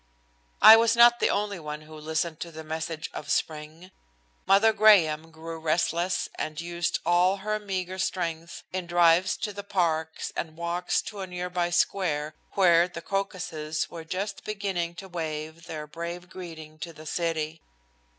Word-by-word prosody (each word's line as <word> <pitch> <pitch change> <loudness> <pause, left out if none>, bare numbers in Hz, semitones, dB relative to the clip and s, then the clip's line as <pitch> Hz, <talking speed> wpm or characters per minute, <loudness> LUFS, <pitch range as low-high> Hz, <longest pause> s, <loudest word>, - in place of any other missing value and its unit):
I 220 - +12
was 230 0 +3
not 240 0 +7
the - - +3
only 205 -2 -1
one 150 -1 -6
who 155 +1 -14
listened 160 +1 -2
to 170 - -5
the 160 0 -8
message 160 0 -4
of 145 - -7
spring. 155 +5 -3 0.6
Mother 210 +3 +5
Graham 165 -8 +5
grew 165 0 -8
restless 170 +3 0
and 155 -1 -3
used 170 0 -1
all 175 +3 +4
of - - -11
her 215 +1 -1
meagre 190 -2 -4
strength 170 -3 -3
in 185 -2 -3
drives 175 +1 +4
to 210 - -4
the 200 0 -7
parks 160 -5 -1
and 160 -1 -4
walks 170 +1 -1
to 210 -3 -8
a 190 - -4
nearby 180 -1 -2
square 165 -4 0 0.2
where 175 -3 +5
the 170 -2 -9
crocuses 170 -6 -3
were 165 -1 -7
just 190 +5 -4
beginning 195 -5 -3
to 195 - -9
wave 160 -1 -5
their 155 -1 -5
brave 170 +3 -7
greeting 160 -4 -9
to 165 +2 -6
the 155 0 -12
city. 160 -1 -2
170 Hz, 160 wpm, -27 LUFS, 160-185 Hz, 0.6 s, I